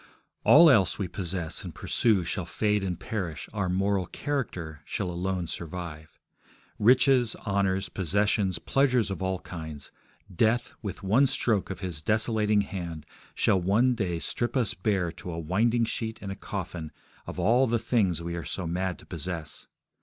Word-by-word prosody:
All 165 +3 +8
else 100 - +5
we 100 - -2
possess 90 -2 -3
and - - -8
pursue 105 -6 +2
shall 85 - -3
fade 105 -1 +1
and 90 -3 -2
perish, 90 - -4
our 100 -4 -1
moral 95 0 +1
character 90 - -4
shall 90 - -3
alone 90 +1 -2
survive. 80 -2 -7 0.6
Riches, 125 +1 +5
honours, 95 -1 +1
possessions, 95 +1 +1
pleasures 125 +2 +2
of 95 - -4
all 95 0 0
kinds: 80 -5 -8 0.4
death, 115 +6 +2
with 100 -1 -6
one 115 +9 +4
stroke 115 -6 +1
of 95 - -6
his 90 -5 -4
desolating 105 +1 +2
hand, 85 -5 -6 0.3
shall 95 - +3
one 110 +8 +3
day 95 -7 -1
strip 120 +9 -1
us 120 -6 +1
bare 90 -2 0
to 90 - -8
a 85 - -5
winding 110 +9 +2
sheet 110 0 -3
and 100 - -6
a - - -4
coffin 90 -5 -5 0.4
of - - -6
all 125 +5 +4
the 120 +1 +2
things 110 -7 +1
we 85 0 -4
are 85 - -4
so 90 - -3
mad 90 +2 -2
to - - -15
possess. 80 -2 -5
95 Hz, 160 wpm, -28 LUFS, 85-110 Hz, 0.6 s, All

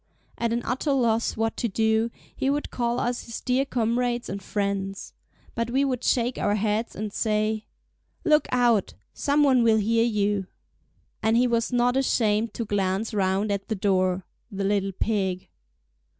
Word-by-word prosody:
At 235 -1 0
an 235 +1 -1
utter 275 +3 0
loss 230 -4 +1
what 225 0 0
to 235 - 0
do, 220 +2 +1 0.3
he 265 - 0
would 290 +1 -1
call 240 0 -1
us 245 0 -2
his 230 - -6
dear 255 +2 +1
comrades 240 -1 -1
and 195 +1 -4
friends. 195 0 -3 0.4
But 230 0 -2
we 270 +3 +2
would 255 -3 -2
shake 245 0 +1
our 205 - +1
heads 215 +2 -1
and 210 -1 -4
say: 215 0 0 0.6
"Look 305 -2 +4
out! 240 -4 +2 0.2
Some 290 0 +2
one 260 -3 +4
will 225 -1 +4
hear 225 +2 +2
you!" 205 -4 0 0.7
And 220 +1 +3
he 245 - +4
was 235 -1 0
not 245 0 +2
ashamed 225 -4 +1
to 230 - -3
glance 200 +1 -1
round 195 +1 +1
at 200 -1 -2
the 220 - -1
door—the 190 +1 -1
little 195 0 +1
pig! 190 -3 -1
225 Hz, 165 wpm, -25 LUFS, 205-245 Hz, 0.7 s, Look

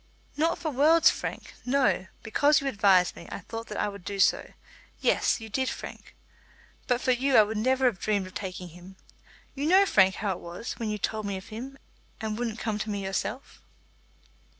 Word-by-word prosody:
"Not 325 +3 +1
for 315 - -3
worlds, 310 +5 +5
Frank. - - -6
No. 250 -8 +1 0.2
Because 290 +7 +3
you 280 - -7
advised 200 -8 +3
me, 170 - -11
I - - -5
thought 225 +4 -7
that - - -6
I - - +1
would 200 -2 -8
do 200 +1 -5
so. 185 - +2 0.5
Yes, - - +2
you 225 - -8
did, 260 +4 -1
Frank. - - -9 0.7
But 245 0 +1
for 255 - +2
you 260 +2 +1
I 215 - +9
would 210 +1 -3
never 260 +3 +2
have 235 -7 +2
dreamed 205 -3 0
of 185 - -11
taking 185 -2 -6
him. 180 +3 -13 0.6
You 285 +2 -2
know, 380 +4 +6
Frank, 190 - +4
how 205 -3 -2
it 185 - -4
was, 175 +7 -6
when 225 -2 -2
you 210 - -2
told 215 +1 -2
me 200 -1 -2
of 190 - -11
him 255 +5 -7 0.4
and 215 -1 -3
wouldn't 230 -1 -3
come 215 -2 -2
to 215 - -3
me 200 -1 -3
yourself." 215 +7 -4
220 Hz, 200 wpm, -27 LUFS, 195-260 Hz, 0.7 s, I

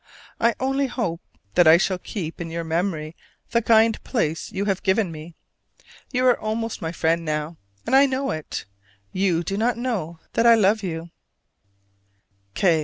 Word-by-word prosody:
I 230 0 +3
only 270 +1 0
hope 230 -10 -3 0.3
that 175 - +5
I 160 +1 +9
shall 185 0 0
keep 175 -4 -6
in 165 - -5
your 165 +1 -4
memory 165 -1 -2 0.4
the 235 - +3
kind 225 0 +3
place 165 - -2
you 195 +1 -2
have 195 -2 0
given 190 -1 +1
me. 160 +1 -10 0.8
You 255 -1 +1
are 250 -1 +4
almost 220 +1 -3
my 165 -1 -3
friend 165 0 0
now, 155 +1 -3 0.3
and - - +2
I 275 +1 +7
know 270 +1 -1
it. 155 -1 -5 0.5
You 185 -3 +1
do 195 +4 -3
not 230 +2 +1
know 215 -10 -3 0.2
that 230 - +3
I 230 - +8
love 215 0 +3
you. 170 -3 -5
195 Hz, 165 wpm, -23 LUFS, 165-230 Hz, 0.8 s, I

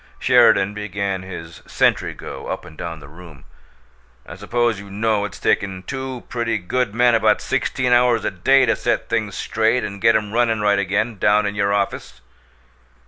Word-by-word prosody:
Sheridan 100 +1 +4
began 100 -2 -3
his 85 -3 -9
sentry - - +1
go - - -8
up - - -5
and 80 - -13
down 80 -1 -7
the - - -12
room. 80 -3 -14 0.8
"I - - -10
suppose 115 +2 -1
you 100 0 -11
know 105 +1 0
it's 100 - -8
taken 95 -2 -1
two 130 +2 -6
pretty 115 -2 -2
good 110 +3 -2
men 120 0 +4
about 115 - +3
sixteen 125 -2 -1
hours 120 -2 +3
a - - 0
day 135 +9 +3
to 115 - +2
set - - -2
things - - -1
straight 115 +3 0
and 100 0 -6
get 115 - +4
'em 105 -1 -1
runnin' 115 -2 +1
right 105 -1 +2
again, 100 +3 -1
down 105 +1 +3
in 100 - -2
your 100 -1 0
office?" 100 -10 -2
105 Hz, 180 wpm, -20 LUFS, 95-115 Hz, 0.8 s, Sheridan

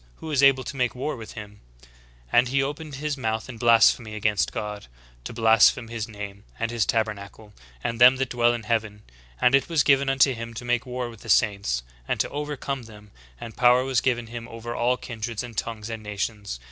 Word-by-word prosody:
who 160 - -8
is 140 -2 +2
able 135 -1 +5
to 140 - -7
make 125 -1 0
war 135 +5 -3
with 110 -3 -10
him? 105 -2 -10
* - - -24
=«= - - -28
* - - -27
And 120 +1 +5
he 135 +2 +1
opened 145 +1 -5
his 145 +1 -3
mouth 110 -3 -2
in 120 -3 -9
blasphemy 115 -1 +4
against 105 -4 0
God, 105 - -5 0.4
to - - -5
blaspheme 115 +1 +4
His 115 -2 -4
name, 100 -2 -8
and 115 0 -2
His 120 -2 0
tabernacle, 105 -1 -3 0.3
and 115 0 -3
them 125 +2 +9
that 130 -1 -2
dwell 120 -1 +3
in 115 - -6
heaven. 105 -2 -2 0.4
And 125 - +4
it 135 +4 +3
was 160 -3 +3
given 140 -1 +3
unto 135 0 +4
him 115 0 -7
to 120 - -7
make 120 +1 0
war 125 0 -3
with 115 -3 -12
the 115 - -11
saints, 100 - +2 0.2
and - - -1
to - - +1
overcome 145 -3 -4
them: 105 -2 -15 0.3
and 115 - -9
power 125 0 +5
was 130 -3 +1
given 120 -2 0
him 115 0 -8
over 115 0 -7
all 125 +2 +1
kindreds, 115 -2 -5
and 120 -2 -9
tongues, 110 0 -4
and 115 -1 -6
nations. 105 - -4
115 Hz, 220 wpm, -25 LUFS, 105-125 Hz, 0.4 s, them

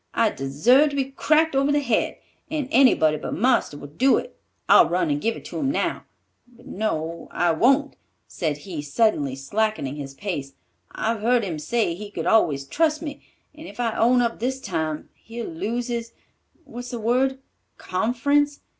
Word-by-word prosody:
I 225 -2 +3
deserve 210 - +3
to 285 - -6
be 270 -1 -1
cracked 310 +2 +2
over 275 +1 +2
the 290 - +3
head, 245 -6 0 0.3
and 300 -4 -2
anybody 225 - +4
but - - -5
marster 235 - +1
would 145 +1 -12
do 265 +1 +5
it. - - -6 0.3
I'll - - +7
run 330 -4 +1
and 290 0 -1
give 230 0 0
it - - -12
to - - -6
him 275 - 0
now—but 245 -4 -6
no, 170 - -3
I 175 -1 +1
won't," 270 - +2 0.3
said 155 -5 -2
he, 170 -6 -5
suddenly 145 - +1
slackening 150 -1 -2
his 135 -2 -7
pace, 145 -7 -5 0.4
"I've 225 -1 -2
heard 240 +1 +2
him 170 -6 -4
say 220 +1 0
he 205 +4 -8
could - - -5
always 145 -11 +3
trust 310 - 0
me, 295 -2 -6 0.3
and 310 +2 -11
if - - -12
I 230 -2 0
own 245 +2 +4
up 230 -1 -2
this 260 +3 -2
time, 160 - -3
he'll 230 0 -8
lose 225 +9 -3
his—what's 240 +2 -9
the 240 -2 -5
word? 255 +4 +1 0.4
Conference? 285 +9 0
230 Hz, 170 wpm, -23 LUFS, 170-270 Hz, 0.4 s, I'll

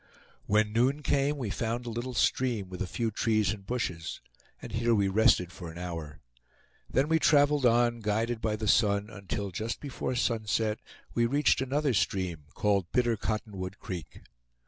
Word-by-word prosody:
When 105 +1 +2
noon 130 +6 +2
came, 140 +1 +1
we 120 -7 -3
found 120 +3 -2
a 120 - -4
little 120 +2 -4
stream, 115 -6 +1
with 90 - -7
a - - -1
few 115 +4 -2
trees 110 0 +1
and 100 -2 -10
bushes; 90 -10 -3 0.4
and - - -9
here 115 +1 +2
we 100 -2 +2
rested 95 -3 +3
for 90 -2 -8
an 80 - -10
hour. 80 -6 -6 0.7
Then 135 +3 +2
we 160 +1 +3
traveled 145 -3 +4
on, 120 0 +3
guided 110 +2 -1
by 110 -1 0
the 110 0 -3
sun, 100 0 +3
until, 100 -1 -4
just 110 +6 -3
before 130 -2 -4
sunset, 110 -2 0 0.3
we 120 0 +2
reached 140 +1 +3
another 140 +1 +1
stream, 90 -7 -1
called 100 -4 +1
Bitter 120 -2 +2
Cotton 110 -1 -3
wood 95 +1 -5
Creek. 85 -5 -7
110 Hz, 170 wpm, -29 LUFS, 100-120 Hz, 0.7 s, traveled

